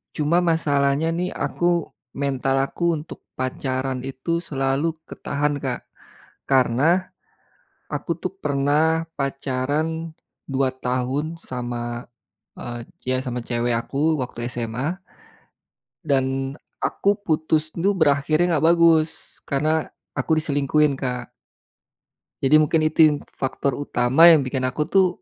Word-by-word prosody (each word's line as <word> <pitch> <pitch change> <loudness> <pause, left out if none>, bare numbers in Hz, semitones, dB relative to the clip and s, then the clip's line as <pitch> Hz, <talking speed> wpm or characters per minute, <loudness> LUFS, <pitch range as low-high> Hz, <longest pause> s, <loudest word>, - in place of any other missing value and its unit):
cuma 155 +3 +2
masalahnya 150 -2 +2
nih 180 +2 -1
aku 175 -2 0 0.3
mental 135 -1 0
aku 170 +4 0
untuk 155 - -11 0.2
pacaran 130 0 -2
itu 135 +6 -2
selalu 135 +1 0 0.2
ketahan 145 +1 -1
Kak, 130 -3 -3 0.7
karena, 140 +8 +3 0.8
aku - - -2
tuh - - -4
pernah 155 +4 +2
pacaran 145 +4 -2 0.4
2 135 -1 +1
tahun 130 +6 -2
sama, 120 -2 -5 0.5
eee, 120 0 -6 0.3
ya 130 0 +1
sama 125 -1 -3
cewek 120 0 0
aku 140 +7 0
waktu 120 -1 -5
SMA. 120 +7 -2 1.1
Dan 135 0 0 0.2
aku 200 +1 +2
putus 155 -3 0
tuh 190 +6 0
berakhirnya 155 +1 +2
gak 160 - +3
bagus 160 -1 +2
karena 155 +3 +1 0.3
aku 160 - +2
diselingkuhin, 145 -1 +1
Kak. 125 -2 -4 1.1
Jadi 140 +3 +5
mungkin 155 +1 +3
itu 155 0 -1
yang 150 -1 0 0.2
faktor 135 +1 -1
utama 135 +2 +4
yang 160 -4 +8
bikin 130 0 -1
aku 130 +4 -1
tuh, 190 -1 +5
140 Hz, 115 wpm, -23 LUFS, 130-160 Hz, 1.1 s, yang